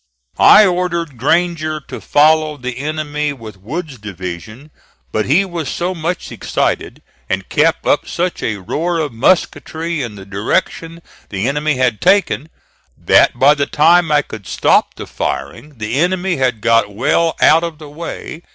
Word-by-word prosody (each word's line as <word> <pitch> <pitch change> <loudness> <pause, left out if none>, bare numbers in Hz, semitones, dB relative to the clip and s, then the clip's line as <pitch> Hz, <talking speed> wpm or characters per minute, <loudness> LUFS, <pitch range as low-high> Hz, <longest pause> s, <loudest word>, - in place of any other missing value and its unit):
I 210 - +8
ordered 170 -7 -1
Granger 155 +2 0
to - - -9
follow 155 0 +3
the 125 -1 -6
enemy 150 0 -2
with 110 -6 -11
Wood's 145 - -6
division, 100 - -8 0.4
but 110 - -1
he 165 +9 +3
was 170 -5 -5
so 180 +2 -2
much 170 +1 -4
excited, - - -2 0.3
and - - -2
kept - - +1
up - - +1
such 180 0 -2
a 110 -2 -2
roar 165 - -2
of 150 -6 -2
musketry 165 +3 0
in 115 -5 -5
the 95 -1 -11
direction 165 - -2 0.3
the 100 +3 -2
enemy 150 +2 0
had 125 -4 0
taken, 185 -5 +2 0.5
that - - +3
by 140 +4 +6
the 140 -2 -1
time 165 +2 +4
I 145 -1 +3
could 105 -3 -10
stop - - +2
the - - -7
firing 95 - -5
the 105 +1 -4
enemy 180 +1 0
had 125 -5 0
got 115 -2 +2
well 160 +10 +1
out 160 +2 +5
of 165 -2 -4
the 155 -1 -11
way. 160 +1 -7
150 Hz, 160 wpm, -16 LUFS, 120-170 Hz, 0.5 s, I